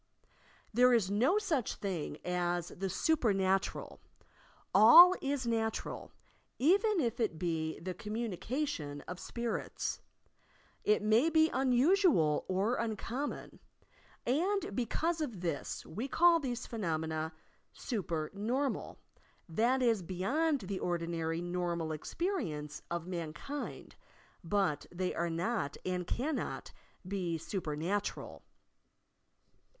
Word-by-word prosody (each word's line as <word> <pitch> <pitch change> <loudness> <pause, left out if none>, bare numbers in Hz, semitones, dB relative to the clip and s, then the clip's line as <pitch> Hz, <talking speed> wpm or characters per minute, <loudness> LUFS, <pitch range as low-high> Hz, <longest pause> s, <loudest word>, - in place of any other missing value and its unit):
There 250 +2 +6
is 200 -4 +1
no 250 - +3
such 335 - 0
thing 175 -7 -4
as 175 -1 -1
the 195 +1 -4
"super 255 - +2
natural." 190 0 0 0.7
All 325 - +10
is 275 -2 -1
natural, 225 -1 -2 0.5
even 395 - +3
if 235 -5 -1
it 210 -9 0
be 160 -2 -2
the 185 +3 -4
communica 225 - -3
tion 145 - -5
of 180 0 -8
spirits. 235 -1 -3 0.8
It 210 0 +3
may 220 +9 +4
be 320 0 +4
unusual 260 - +3
or 200 +6 +1
uncommon, 230 +5 -4 0.7
and 340 - 0
because 320 +8 0
of 235 - -4
this 165 -5 -3
we 225 +10 -4
call 340 +3 +5
these 250 -4 -3
phenomena 160 -6 -2 0.4
super 170 - -3
normal, 245 +7 -2 0.5
that 235 +9 +2
is 230 -5 +3
beyond 260 - 0
the 190 0 -4
ordinary 165 -1 -2
normal 175 -2 -2
experience 155 - -3
of 170 -1 -3
man 170 -4 -4
kind; 280 - -6 0.5
but 175 -4 0
they 180 +1 -2
are 170 0 -1
not 170 -1 -1
and 180 -1 -2
cannot 280 +5 -2 0.4
be 180 -4 -2
super 160 -2 -4
natural. 195 +7 -3
205 Hz, 115 wpm, -33 LUFS, 170-260 Hz, 0.8 s, All